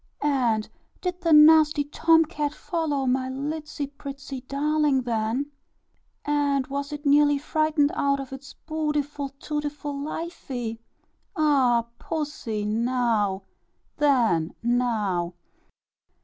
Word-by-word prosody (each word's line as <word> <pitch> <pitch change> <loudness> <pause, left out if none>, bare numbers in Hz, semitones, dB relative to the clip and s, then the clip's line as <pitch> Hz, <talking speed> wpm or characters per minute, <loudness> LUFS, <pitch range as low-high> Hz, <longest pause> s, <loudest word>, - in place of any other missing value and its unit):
"And 245 -7 +1 0.3
did 360 -1 -4
the 335 -2 +1
nasty 300 -1 +7
Tom 325 +3 +3
cat 300 -2 -3
follow 310 -6 -2
my 260 0 0
litsy 295 +2 -4
prettsy 280 -1 -8
darling, 290 -1 +1
then? 235 +4 -1 0.7
And 285 -2 +1
was 280 +2 -4
it 295 0 -7
nearly 290 0 +5
frightened 300 0 +1
out 280 0 +1
of 270 -1 -7
its 270 +1 -10
bootiful, 295 -2 -2
tootiful 295 -1 -4
lifie? 280 -6 -5 0.6
Ah! 265 -6 +3
pussy, 290 -9 -3
now, 220 -3 0 0.5
then, 230 - +2
now." 215 -8 0
280 Hz, 105 wpm, -25 LUFS, 245-300 Hz, 0.7 s, nasty